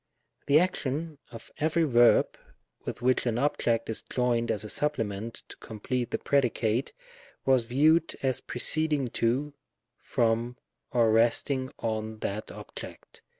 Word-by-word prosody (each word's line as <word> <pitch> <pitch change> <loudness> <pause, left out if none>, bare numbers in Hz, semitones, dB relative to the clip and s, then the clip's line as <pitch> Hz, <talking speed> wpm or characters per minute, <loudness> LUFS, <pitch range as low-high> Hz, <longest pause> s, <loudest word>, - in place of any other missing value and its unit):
The 145 +2 +6
action 155 -3 -2
of 115 -1 -11
every 160 +2 +2
verb 120 -5 +4 0.5
with 120 - -5
which 130 0 +2
an 115 -1 0
object 120 -4 +1
is 110 - -3
joined 120 -2 0
as 105 - 0
a - - -6
supplement 115 -7 -2
to - - -8
complete 120 +3 -4
the - - -1
predicate, 125 -3 +1 0.5
was 130 -3 +3
viewed 155 +7 +3
as 130 -2 0
preceding 150 0 0
to, 130 +7 0 0.5
from, 115 +1 0 0.3
or 115 -3 +3
resting 125 +4 +2
on 110 -1 -3
that 105 +2 -3
object. - - -10
125 Hz, 130 wpm, -28 LUFS, 115-140 Hz, 0.5 s, The